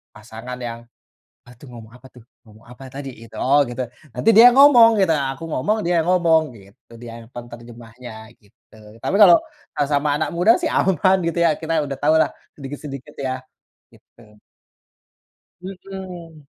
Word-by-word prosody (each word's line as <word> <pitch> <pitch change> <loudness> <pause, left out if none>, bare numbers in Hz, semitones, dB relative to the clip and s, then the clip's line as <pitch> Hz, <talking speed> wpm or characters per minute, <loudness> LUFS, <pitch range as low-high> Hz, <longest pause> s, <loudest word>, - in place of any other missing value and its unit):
pasangan 115 +4 -10
yang, 115 -1 -6 0.7
bantu 125 +2 -16
ngomong 115 -2 -13
apa 130 +1 -17
tuh? 125 - -16 0.2
Ngomong 110 0 -19
apa 125 +2 -14
tadi 135 0 -7 0.2
itu? 115 - -20
Oh 140 +3 +3
gitu 120 +1 -5 0.3
nanti 125 - 0
dia 235 +2 +10
ngomong 260 -5 +7
gitu 190 - +2
aku 135 +1 -4
ngomong 210 +11 -1
dia 175 0 0
ngomong 170 -3 +3
gitu 100 +2 -20
dia 120 -1 -9
yang 115 - -16
penterjemahnya 120 0 -12 0.3
gitu 110 +2 -26 0.3
tapi - - -2
kalau, 185 -4 +8 0.5
eee, 145 - +1
sama 145 +1 0
anak 155 - -2
muda 180 +6 +4
sih 325 - -1
aman 190 +1 +2
gitu 170 - -4
ya 165 - +3
kita 160 -1 -1
udah 135 -1 -6
tahulah 160 +2 +3 0.3
sedikit-sedikit 140 0 -9
ya, 130 0 -2 0.6
gitu. 105 -2 -22 1.2
Mhm. 180 -5 -10
140 Hz, 150 wpm, -20 LUFS, 120-170 Hz, 1.2 s, dia